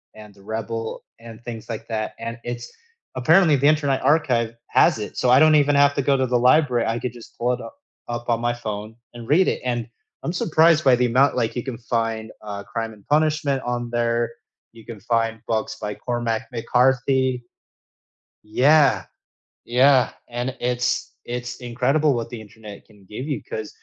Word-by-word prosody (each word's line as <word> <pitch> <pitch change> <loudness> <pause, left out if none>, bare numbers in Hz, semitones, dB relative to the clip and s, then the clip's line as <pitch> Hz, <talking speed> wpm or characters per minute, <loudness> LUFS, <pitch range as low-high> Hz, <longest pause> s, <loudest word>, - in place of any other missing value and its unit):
and 105 -1 -13
The 100 - -20
Rebel, 115 +1 -5 0.2
and 115 -1 -12
things 115 -1 -8
like 115 -2 -6
that, 110 -1 -3
and 115 +1 -5
it's 120 0 -6 0.4
apparently 160 +5 +4
the 140 +2 +3
Internet 145 -3 +2
Archive 120 -7 +2
has - - +3
it, 105 - -7
so 125 - +1
I 130 +2 +7
don't 155 0 +6
even 145 -1 +4
have 140 0 +5
to - - +1
go 140 0 +2
to 130 - +1
the 125 0 +2
library, 125 -1 +3
I 115 +1 -1
could 125 - -4
just 120 -2 -14
pull 125 +1 +1
it 125 - -4
u - - -8 0.4
up 120 0 -4
on 115 -1 +1
my 120 0 +1
phone 110 -2 -6 0.2
and 120 -1 -10
read 175 +6 +4
it, - - -1
and 120 -2 -2 0.4
I'm 165 - -2
surprised 160 -2 +3
by 130 -2 +6
the 125 0 +1
amount 130 +3 +3
like, 115 -1 -1
you 120 - -3
can 130 -4 -5
find, 115 -2 -2
uh, 100 -1 -6
Crime 115 +3 -4
and 105 -2 -19
Punishment 150 -2 +1
on 120 -1 -3
there, 120 0 0 0.4
you 115 -1 -15
can 115 -3 -9
find 115 +1 -1
books 110 -1 -2
by 105 -1 -3
Cormac 120 -2 -2
McCarthy. 125 +2 +1 1.0
Yeah. 140 +6 +4 0.6
Yeah. 130 +1 +4 0.2
And 120 +2 -4
it's 125 0 -1 0.2
it's 125 0 -5
incredible, 130 +4 +1
what 115 -1 -3
the 120 - -7
Internet 105 -1 -12
can 105 -3 -21
give 125 +7 -6
you, 135 - -1
'cause 110 -1 -6
120 Hz, 185 wpm, -22 LUFS, 115-135 Hz, 1.0 s, I